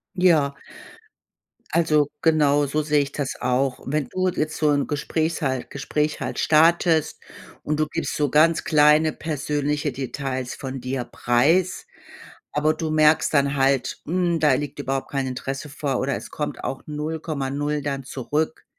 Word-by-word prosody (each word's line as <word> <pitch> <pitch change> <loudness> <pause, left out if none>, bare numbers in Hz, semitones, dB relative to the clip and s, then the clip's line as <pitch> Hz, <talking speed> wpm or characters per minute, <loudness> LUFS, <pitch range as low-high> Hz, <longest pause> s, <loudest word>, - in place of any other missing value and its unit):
Ja. 160 -6 +3 1.2
Also, 155 -3 +2
genau 145 -3 +3
so 150 +3 -1
sehe 150 -1 +2
ich 140 0 -5
das 145 -3 -3
auch. 130 +1 0
Wenn 145 +1 -1
du 185 0 0
jetzt 155 -2 -2
so 150 -1 +2
'n 145 -1 +1
Gesprächs 160 +3 -2
halt 130 -3 -1
Gespräch 150 +2 -2
halt - - -4
startest 160 0 +3 0.4
und 150 0 -2
du 155 - +2
gibst - - -3
so 145 -3 +1
ganz 160 +2 +4
kleine 150 +1 +4
persönliche 150 -1 -2
Details 130 -1 -4
von 135 -1 -6
dir 130 0 -3
preis, 160 - +1 0.7
aber 155 +1 +2
du 160 0 -3
merkst 155 0 +3
dann 140 0 +2
halt, 135 -1 +1
hm, 175 0 +1
da 150 -3 +4
liegt 145 +1 -4
überhaupt 135 -1 -3
kein 135 -1 -1
Interesse 135 +3 -5
vor 140 -3 -2
oder 135 +1 -1
es - - -8
kommt 150 - -4
auch 135 - -4
0,0 150 -1 -3
dann 135 -2 -3
zurück, 150 +5 -3
150 Hz, 155 wpm, -23 LUFS, 135-155 Hz, 1.2 s, ganz